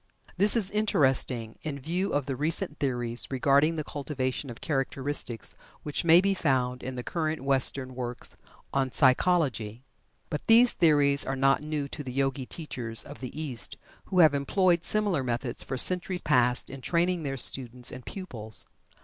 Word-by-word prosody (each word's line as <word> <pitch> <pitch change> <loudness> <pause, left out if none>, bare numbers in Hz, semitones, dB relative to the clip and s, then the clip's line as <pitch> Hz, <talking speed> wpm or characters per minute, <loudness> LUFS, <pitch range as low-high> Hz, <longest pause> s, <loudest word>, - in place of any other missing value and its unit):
This 205 +3 +6
is 195 -4 +3
interesting, 130 - +1
in 150 -3 -5
view 175 +8 -2
of 145 -2 -1
the 135 -1 -3
recent 155 +3 +1
theories 120 -3 -1
regarding 140 +4 +2
the 155 - -3
cultivation 135 -2 -4
of 120 - -9
characteristics 135 -4 -2 0.3
which 150 - -2
may 170 +1 +6
be 195 0 +1
found 130 -7 -1
in 130 0 -6
the 125 - -5
current 160 -1 -3
Western 135 -1 +1
works 125 -1 -5 0.4
on 135 -1 0
psychology. 130 -6 +1 0.5
But 150 - -5
these 235 +2 +7
theories 145 -4 +3
are 135 - -3
not 135 +1 +2
new 150 -2 -3
to 150 - -7
the 130 - -6
Yogi 135 -1 -1
teachers 120 -8 -2
of 145 - -11
the 130 +3 -7
East, 135 -7 -3 0.3
who 185 - -4
have 155 -3 +6
employed 170 +5 +1
similar 205 -8 +2
methods 120 0 -2
for 130 - -5
centuries 180 +5 +3
past 125 -4 +1
in 135 0 -9
training 175 +3 0
their 135 -3 -4
students 125 -1 -1
and 130 - -9
pupils. 115 - -6
140 Hz, 165 wpm, -27 LUFS, 130-160 Hz, 0.5 s, these